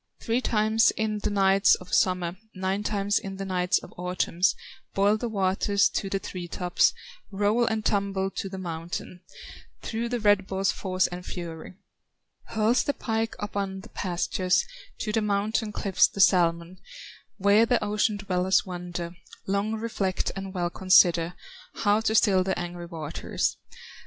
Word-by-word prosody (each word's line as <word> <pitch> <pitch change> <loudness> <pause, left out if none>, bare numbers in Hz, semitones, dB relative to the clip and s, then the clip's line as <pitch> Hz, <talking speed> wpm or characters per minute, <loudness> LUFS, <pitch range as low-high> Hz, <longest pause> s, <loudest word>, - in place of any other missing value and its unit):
"Three 235 +2 0
times 220 -1 +3
in 215 -1 -1
the - - -2
nights 195 0 +4
of 180 - -12
summer, 180 -2 +2 0.2
Nine 190 +2 -1
times 205 -1 0
in 195 -1 -7
the 195 - -4
nights 180 0 +1
of - - -9
autumn, 180 -1 -3 0.5
Boil 200 +2 +4
the 235 +2 -3
waters 200 0 +2
to 195 - -3
the 195 - 0
tree 180 -2 -6
tops, 180 0 +2 0.4
Roll 205 +4 +1
and 220 -2 -1
tumble 195 -1 0
to 195 - -4
the 190 - -7
mountain, 170 0 -6 0.6
Through 230 +1 -3
the 245 0 -1
red 205 -2 +3
ball's 195 0 0
force 185 -1 0
and 180 0 -5
fury; 170 -1 -7 0.7
Hurls 220 +3 +2
the 285 - -1
pike 225 -1 -2
upon 195 -1 -4
the - - -14
pastures, 185 - 0 0.4
To 215 - -2
the 220 +1 +1
mountain 210 +2 0
cliffs, 195 -3 +3
the - - -10
salmon, 175 -1 +3 0.6
Where 200 +4 +4
the 245 - +2
ocean 210 +1 +1
dwellers 190 -1 +1
wonder, 175 -1 -6 0.3
Long 200 +3 0
reflect 215 -4 -2
and 195 0 -5
well 175 -2 -2
consider 175 -2 +4 0.4
How 205 0 +2
to 220 0 0
still 190 -3 +4
the 190 0 -1
angry 175 0 -5
waters. 160 -3 -3
195 Hz, 155 wpm, -26 LUFS, 180-210 Hz, 0.7 s, nights